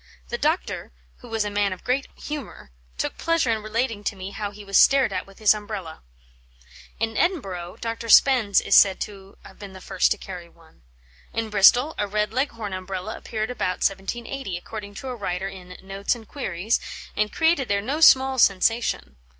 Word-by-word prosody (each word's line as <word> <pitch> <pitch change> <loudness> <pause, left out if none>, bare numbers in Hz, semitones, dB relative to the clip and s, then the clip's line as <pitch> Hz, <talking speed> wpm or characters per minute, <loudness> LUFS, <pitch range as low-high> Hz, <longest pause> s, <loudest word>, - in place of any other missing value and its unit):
The - - -2
doctor, - - -1 0.3
who 245 - -14
was 225 -2 -1
a 205 - -3
man 205 -1 +1
of 185 - -12
great 265 +3 0
humour, 290 - -7 0.3
took - - -3
pleasure 330 -7 +1
in 220 -1 -1
relating 220 0 -2
to 205 - -1
me 190 +1 -7
how 205 0 -4
he 205 0 -12
was 195 0 -4
stared 270 -7 +5
at 185 +1 -3
with 195 - -17
his 215 -1 +5
Umbrella." 205 -6 -7 1.0
In 225 0 -1
Edinburgh 195 - -1
Dr. 230 0 -4
Spens 235 -6 +6
is - - -1
said 190 -2 +6
to 195 -2 -8
have - - -15
been 200 -2 -9
the 190 - -10
first - - +1
to - - 0
carry 180 -3 -9
one. 165 - -23 0.5
In 225 -1 -3
Bristol 245 +9 +5
a 205 - 0
red 210 +1 -1
Leghorn 230 -6 -2
Umbrella 185 +2 -5
appeared 220 +1 -4
about 185 -7 -1
1780, 195 +2 -5
according 205 +2 -8
to 265 - -7
a 250 - -4
writer 195 -3 -3
in 180 -2 -10
Notes 195 +4 -1
and 225 -3 -13
Queries, 210 -5 -1 0.4
and 210 0 0
created 320 -5 +2
there 200 0 +1
no 270 +10 -3
small 265 -3 +6
sensation. 195 - +2
210 Hz, 185 wpm, -24 LUFS, 195-240 Hz, 1.0 s, Spens